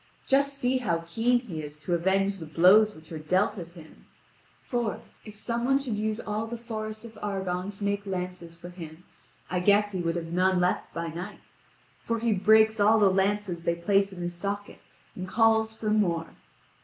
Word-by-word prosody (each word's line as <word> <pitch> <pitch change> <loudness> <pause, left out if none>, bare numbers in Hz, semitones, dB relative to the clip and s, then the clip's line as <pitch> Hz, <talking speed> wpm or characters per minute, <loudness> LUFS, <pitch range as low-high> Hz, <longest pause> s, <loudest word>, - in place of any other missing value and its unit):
Just 280 0 +2
see 255 0 +1
how 170 -9 -1
keen 235 +8 +1
he 175 -11 -6
is 150 0 -9
to 175 +4 -2
avenge 195 +3 +1
the 160 - -7
blows 195 +7 +5
which 155 +1 -16
are 160 - -5
dealt 185 +6 +1
at 170 -1 -9
him. 160 -3 -15 0.5
For, 240 -4 -2 0.3
if 215 -1 -10
some 235 +2 -3
one 270 +2 +3
should 275 -5 -3
use 215 +1 -2
all 215 +1 -3
the 235 +1 -5
forest 215 -1 -6
of 225 - -10
Argone 190 -2 -2
to 205 - -7
make 200 0 -1
lances 180 -3 -5
for 175 - -9
him, 170 -1 -10 0.5
I 180 - +1
guess 205 +2 +3
he 185 -3 -3
would 165 0 -1
have 165 -1 -4
none 185 +1 +3
left 180 0 0
by 170 0 -4
night. 175 +6 -7 0.6
For 230 - -1
he 230 -1 +1
breaks 220 +2 +4
all 210 +2 +5
the 205 -3 +5
lances 195 -2 0
that - - -18
they - - -14
place 195 +2 +2
in 180 -2 -7
his 175 0 -3
socket, 200 +3 -5 0.3
and 185 0 -6
calls 220 +1 +2
for 215 -1 -2
more. 170 -6 +1
200 Hz, 200 wpm, -27 LUFS, 175-220 Hz, 0.6 s, blows